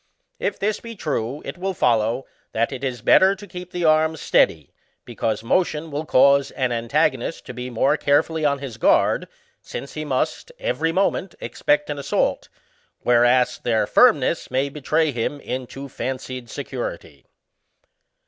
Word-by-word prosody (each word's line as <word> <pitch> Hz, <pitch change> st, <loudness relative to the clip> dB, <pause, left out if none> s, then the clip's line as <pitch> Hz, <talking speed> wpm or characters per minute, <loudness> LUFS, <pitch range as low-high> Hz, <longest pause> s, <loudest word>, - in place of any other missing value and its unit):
If -, -, -1 dB
this 210 Hz, +1 st, -1 dB
be 230 Hz, 0 st, -9 dB
true, 140 Hz, -, -3 dB
it -, -, -7 dB
will 190 Hz, 0 st, -2 dB
follow, 115 Hz, 0 st, +1 dB, 0.3 s
that 115 Hz, +1 st, 0 dB
it 135 Hz, 0 st, -6 dB
is 125 Hz, -4 st, -3 dB
better 190 Hz, +1 st, +6 dB
to 200 Hz, +1 st, -11 dB
keep 180 Hz, -2 st, -9 dB
the 175 Hz, -1 st, -2 dB
arms 155 Hz, 0 st, +3 dB
steady, 75 Hz, -4 st, +2 dB, 0.3 s
because 110 Hz, -1 st, -2 dB
motion 160 Hz, +3 st, 0 dB
will 150 Hz, +2 st, -4 dB
cause 140 Hz, +1 st, +5 dB
an 130 Hz, -3 st, -1 dB
antagonist 115 Hz, -1 st, 0 dB
to -, -, -7 dB
be 125 Hz, +1 st, -6 dB
more 120 Hz, +3 st, +2 dB
carefully 155 Hz, +3 st, +1 dB
on 140 Hz, -1 st, +2 dB
his 135 Hz, -5 st, -7 dB
guard, -, -, +3 dB, 0.3 s
since 140 Hz, -, -7 dB
he 155 Hz, -, -4 dB
must, 155 Hz, -, -2 dB
every -, -, -1 dB
moment 190 Hz, 0 st, 0 dB
expect 195 Hz, 0 st, 0 dB
an 145 Hz, -, -4 dB
assault; 140 Hz, -, -1 dB, 0.5 s
whereas, 120 Hz, +1 st, +3 dB
their 115 Hz, -2 st, +1 dB
firmness -, -, +3 dB
may 130 Hz, +2 st, 0 dB
betray 150 Hz, +2 st, 0 dB
him 125 Hz, +4 st, -3 dB
into 130 Hz, +1 st, -6 dB
fancied 130 Hz, -2 st, -5 dB
security. -, -, -6 dB
140 Hz, 150 wpm, -22 LUFS, 125-165 Hz, 0.5 s, better